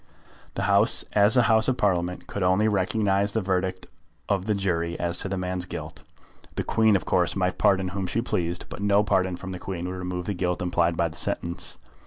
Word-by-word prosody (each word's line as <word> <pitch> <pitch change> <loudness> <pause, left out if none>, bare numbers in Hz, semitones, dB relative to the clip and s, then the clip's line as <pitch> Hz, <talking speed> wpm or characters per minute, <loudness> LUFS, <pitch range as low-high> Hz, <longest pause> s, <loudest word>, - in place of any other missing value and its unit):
The - - -2
House, 100 +5 +6
as 105 +4 +5
a 125 - +5
House 110 -1 +5
of 130 -1 0
Parliament, 90 -3 -1
could 100 - -6
only 95 +4 +2
recognise 100 0 +1
the 110 - +1
verdict 95 -1 -2 0.4
of 100 0 -1
the 105 - +1
jury 85 -4 -2
as 85 0 -1
to 95 - -1
the 95 - -3
man's 90 0 -3
guilt. - - -8 0.5
The - - -2
Queen, 110 -2 +2
of 95 - -1
course, 90 -2 +1
might 95 -1 -1
pardon 95 -1 +2
whom 95 0 -4
she 110 - -1
pleased, 90 -7 -2
but - - -9
no 100 0 +3
pardon 95 -2 0
from 95 +2 -8
the 90 - -6
Queen 90 -2 -5
would 90 - -4
remove 90 -1 -4
the 105 - -2
guilt 90 -1 -2
implied 85 -1 0
by 85 - +1
the 80 - -12
sentence. 85 0 -3
95 Hz, 215 wpm, -25 LUFS, 90-100 Hz, 0.5 s, House